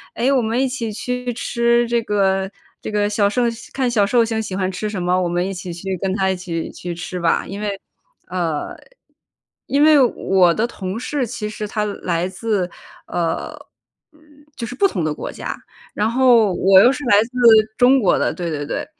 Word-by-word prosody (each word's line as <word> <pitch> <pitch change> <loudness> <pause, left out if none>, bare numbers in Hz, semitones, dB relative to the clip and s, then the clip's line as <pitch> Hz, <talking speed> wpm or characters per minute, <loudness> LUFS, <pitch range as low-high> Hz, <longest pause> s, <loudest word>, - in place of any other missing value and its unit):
“诶， 240 +3 +1
我 275 -2 +3
们 230 +2 0
一 270 - +2
起 250 -4 -4
去 250 +3 -3
吃 235 0 +1
这 235 0 +1
个 195 -2 0 0.3
这 - - -5
个 205 0 +1
小 205 -1 +2
寿 245 +4 0 0.3
看 260 -2 0
小 215 -4 +2
寿 235 +2 +3
星 225 -1 -2
喜 195 - -6
欢 185 -1 -1
吃 200 +3 -4
什 200 -3 -4
么， 180 +1 +1
我 175 - -1
们 175 +2 -1
一 195 - -4
起 180 -1 -7
去 190 +3 -4
跟 190 -1 -1
她 190 -1 +1
一 190 - 0
起 170 -3 -5
去 175 -1 -6
吃 180 +1 -6
吧。 165 - +1
“因 200 +2 -6
为 200 -2 -3 0.5
呃， 170 -4 -3 0.9
因 280 +1 +1
为 310 -1 +6
我 190 -8 +3
的 220 +5 0
同 195 -2 -5
事， 265 +1 -2
其 225 -2 -5
实 215 0 -5
他 210 +1 -2
来 180 -4 -2
自， 190 -1 -2 0.4
呃， 165 -2 -2 0.6
嗯， 310 - -25 0.4
就 230 - -4
是 250 - -7
不 395 - +2
同 200 - 0
的 155 - -1
国 - - -6
家。 - - -6 0.4
然 215 +2 0
后 240 -4 +4
我 190 +1 +6
又 245 - +6
是 280 +2 -5
来 205 -3 +5
自 230 - -10 0.5
中 255 +2 +5
国 195 - +3
的， - - 0
对 175 -1 -4
对 145 -2 -3
对， - - -3
205 Hz, 220 characters per minute, -20 LUFS, 185-235 Hz, 0.9 s, 为